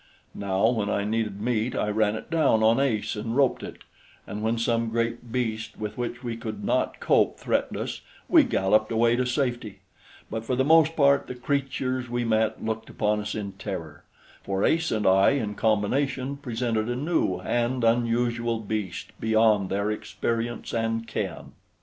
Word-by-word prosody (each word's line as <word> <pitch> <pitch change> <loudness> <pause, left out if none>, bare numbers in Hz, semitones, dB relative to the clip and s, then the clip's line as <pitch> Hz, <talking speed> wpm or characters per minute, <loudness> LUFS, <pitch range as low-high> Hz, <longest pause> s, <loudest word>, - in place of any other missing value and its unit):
Now, 100 +1 +1
when 110 -4 0
I 100 - 0
needed 105 -1 -2
meat, 120 +2 -1
I 105 - 0
ran 105 0 +1
it 110 - -8
down 155 -9 +3
on 115 +3 +4
Ace 120 -7 0
and 115 +2 -3
roped 135 -2 +2
it, - - -9 0.4
and 105 - -6
when 110 +2 0
some 115 0 0
great 115 +1 -2
beast 110 -3 -2
with 105 -1 -5
which 120 +1 -4
we 120 -2 -3
could 110 -3 -6
not - - 0
cope - - +2
threatened - - -1
us, - - -4 0.3
we - - +6
galloped 110 +3 +2
away 115 +1 +3
to 125 0 0
safety; 120 -5 -2 0.5
but 110 0 -4
for 125 +2 -1
the 130 +1 +1
most 160 +1 +5
part 140 -2 +4
the 125 - -6
creatures 130 -1 -2
we 120 0 -1
met 110 -1 0
looked 110 0 -3
upon 105 0 0
us 105 0 -4
in 100 -2 -4
terror, 95 -6 -7 0.4
for 95 0 -1
Ace 165 0 +2
and 105 -2 0
I 95 +5 +5
in 110 -7 -1
combination 130 +6 0
presented 115 -4 -2
a 120 - -1
new 140 - 0
and 120 +6 -1
unusual 115 0 +1
beast 105 -4 -4
beyond 110 -3 +3
their 100 +2 0
experience 115 +2 -3
and 115 0 -1
ken. 115 - -4
115 Hz, 175 wpm, -26 LUFS, 105-125 Hz, 0.5 s, we